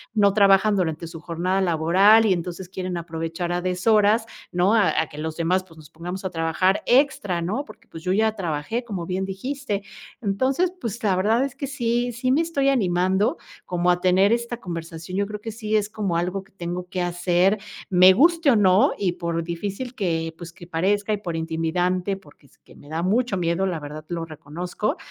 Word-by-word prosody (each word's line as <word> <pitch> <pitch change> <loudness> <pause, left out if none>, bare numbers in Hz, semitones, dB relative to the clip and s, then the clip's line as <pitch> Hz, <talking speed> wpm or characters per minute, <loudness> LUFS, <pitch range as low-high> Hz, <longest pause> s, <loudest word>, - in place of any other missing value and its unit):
no 200 -2 +4
trabajan 200 0 +5
durante 170 -3 -1
su 165 0 -9
jornada 180 +3 -1
laboral, 190 +6 +5
y 200 - +4
entonces, 180 +1 -5
quieren 185 -1 -4
aprovechar 165 +1 -4
a 175 0 -1
deshoras, 210 +4 +3 0.3
¿no?, 180 +4 +2
a 215 -4 +4 0.2
que 150 - -9
los 160 0 -4
demás, 180 +3 +1
pues, 165 -3 -19
nos 155 -2 -14
pongamos 180 +4 -6
a 190 - -2
trabajar 165 +4 +1
extra, 240 -9 +2
¿no? 215 +12 -2
Porque, 235 -4 -16
pues, 160 - -10
yo 185 +1 +1
ya 220 +2 +2
trabajé, 175 +5 -3
como 195 -7 -5
bien 185 +2 -2
dijiste. 205 +2 -4 0.4
Entonces, 260 - +1
pues, 230 +1 -5
la 200 -3 +3
verdad 220 +7 +2
es 275 - -7
que 275 - -4
sí, 245 -3 -1
sí 255 +2 -1
me 285 +5 +3
estoy 285 -5 +1
animando 190 -4 +1 0.3
como 180 0 +1
a 175 0 0
tener 185 +3 +4
esta 235 0 -2
conversación, 165 -2 -6
yo 200 - 0
creo 210 0 -6
que, 225 - -5
sí 215 -1 -3
es 210 -1 +1
como 205 -5 -2
algo 180 +3 -2
que 195 - -27
tengo 180 -1 -5
que 185 -1 -2
hacer, 175 +3 +2 0.3
me 185 -1 +7
guste, 330 - +4
o - - +4
no, 195 -1 +4
y 190 -3 0
por 170 -1 -3
difícil 200 +9 -5
que, 165 -7 -2
pues, 170 -1 -9
que 175 - -12
parezca, 205 +5 0
y - - 0
por 175 -5 -5
intimidante, 175 +4 -1
porque 150 -5 -20
es - - -27
que - - -20
me 145 - -16
da 160 +2 -2
mucho 220 +2 +1
miedo, 175 +2 0
la 175 -4 -2
verdad, 150 +1 -8
lo 170 -1 -3
reconozco, 165 +6 -4
185 Hz, 200 wpm, -23 LUFS, 170-215 Hz, 0.4 s, me